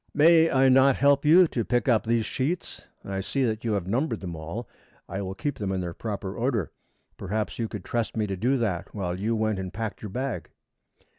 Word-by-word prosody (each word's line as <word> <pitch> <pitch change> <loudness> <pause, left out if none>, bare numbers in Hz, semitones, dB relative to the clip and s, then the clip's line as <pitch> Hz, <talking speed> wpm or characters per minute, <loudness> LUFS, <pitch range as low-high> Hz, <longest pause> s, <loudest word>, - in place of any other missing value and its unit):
"May 165 +2 +6
I 135 0 +4
not 130 +1 +6
help 140 +1 +3
you 175 +4 +7
to 115 - -1
pick 120 -2 0
up 115 -3 +3
these 115 -1 +2
sheets? 150 +9 -3 0.2
I 95 0 -3
see 135 +7 -1
that 110 -3 -1
you 115 -2 0
have 100 -4 -1
numbered 115 +4 -1
them 90 -3 -5
all. 85 +9 -6 0.4
I 95 - -4
will 95 -1 -5
keep 145 +6 -3
them 100 -2 -2
in 95 - -1
their 90 -2 -4
proper 100 -2 -5
order. 115 - -1 0.5
Perhaps 105 +3 -3
you 115 - 0
could 105 -4 -7
trust 115 -1 -2
me 110 - +1
to 100 -2 -3
do 125 +8 +1
that 105 -7 -2
while 90 -3 -3
you 110 +3 0
went 110 -2 0
and 95 -1 -5
packed 110 +1 -5
your 105 - -6
bag?" 130 +4 -4
110 Hz, 220 wpm, -26 LUFS, 95-130 Hz, 0.5 s, you